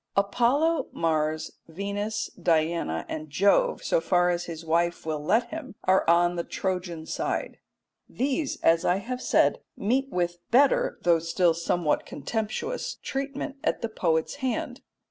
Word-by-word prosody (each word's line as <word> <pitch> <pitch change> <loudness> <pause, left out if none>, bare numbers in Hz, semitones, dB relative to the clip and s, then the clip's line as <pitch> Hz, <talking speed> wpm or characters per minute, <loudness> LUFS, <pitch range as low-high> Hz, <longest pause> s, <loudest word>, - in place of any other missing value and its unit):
Apollo, 255 +11 +2
Mars, 155 -1 0 0.2
Venus, 200 +5 -3
Diana, 160 - 0
and 155 0 -5
Jove, 200 - +2
so - - +2
far 180 - +3
as 175 0 -2
his 165 -1 -7
wife 170 +1 0
will 155 -2 -3
let 225 +10 +2
him, 310 -8 -7
are 190 -2 +3
on 175 +1 +4
the 170 - -1
Trojan 180 -4 -3
side. - - -3 0.5
These, 275 +3 -1
as 165 0 +4
I 180 - +3
have 250 +6 -4
said, - - +3 0.2
meet 260 +6 0
with 175 -3 -1
better, 270 +3 +4
though 170 -2 +4
still 165 +1 +2
somewhat 170 -1 0
contemptuous, 235 - -3
treatment 275 +1 -4
at - - -1
the 230 - -1
poet's 165 - 0
hand. 255 -1 -3
180 Hz, 145 wpm, -27 LUFS, 165-250 Hz, 0.5 s, on